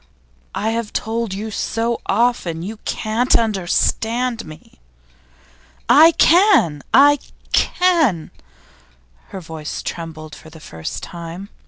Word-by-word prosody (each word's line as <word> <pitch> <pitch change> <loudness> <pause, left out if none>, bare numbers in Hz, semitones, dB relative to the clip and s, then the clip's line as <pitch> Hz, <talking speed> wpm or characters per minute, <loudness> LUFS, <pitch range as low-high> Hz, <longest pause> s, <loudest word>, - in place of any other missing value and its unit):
I 220 +2 -1
have 230 -2 -4
told 225 -1 -2
you 210 +3 -5
so 230 +2 -2
often 195 -7 0
You 215 +4 -6
can't 225 +4 0
understand 225 +3 -1
me!' 155 - -14 1.1
'I 320 +3 +7
can! 335 - +4
I 285 +4 +6 0.3
can!' 320 - +2 1.0
Her 190 - -8
voice 160 -2 -7
trembled 155 -2 -7
for 160 - -13
the 160 0 -14
first 80 - -7
time. 170 +3 -8
215 Hz, 110 wpm, -19 LUFS, 165-240 Hz, 1.1 s, I